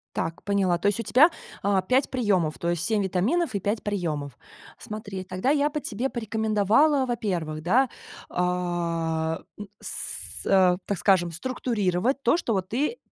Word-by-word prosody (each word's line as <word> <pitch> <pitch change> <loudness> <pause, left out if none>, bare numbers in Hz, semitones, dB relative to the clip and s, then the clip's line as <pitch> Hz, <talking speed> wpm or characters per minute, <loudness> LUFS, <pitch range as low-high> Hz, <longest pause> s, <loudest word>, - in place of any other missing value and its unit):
Так, 165 +1 -3
поняла. 195 -3 +2
То 180 - 0
есть 205 - -2
у - - -1
тебя, 255 - +6 0.3
а, 195 -1 +3
5 255 +8 +2
приемов, 195 - +1
то 170 - -1
есть 175 -2 -1
7 220 -2 +1
витаминов 210 - 0
и - - +1
5 205 +3 -1
приемов. 155 -10 -3 0.4
Смотри, 200 -3 -6
тогда 185 +8 -1
я 295 0 +2
бы 300 - -3
тебе 250 0 -3
порекомендовала, 220 +5 +2
во-первых, 180 -10 -2
да, 250 +9 +3 0.4
а, 170 -3 -1 0.2
м, 205 - -7
с - - -4 0.2
с - - -10
э, 185 -2 +5
так 200 - -1
скажем, 185 -3 +3
структурировать 225 - -1
то, - - +4
что 290 -9 -1
вот 190 -2 -2
ты, 295 - -1
200 Hz, 165 wpm, -26 LUFS, 175-240 Hz, 0.4 s, тебя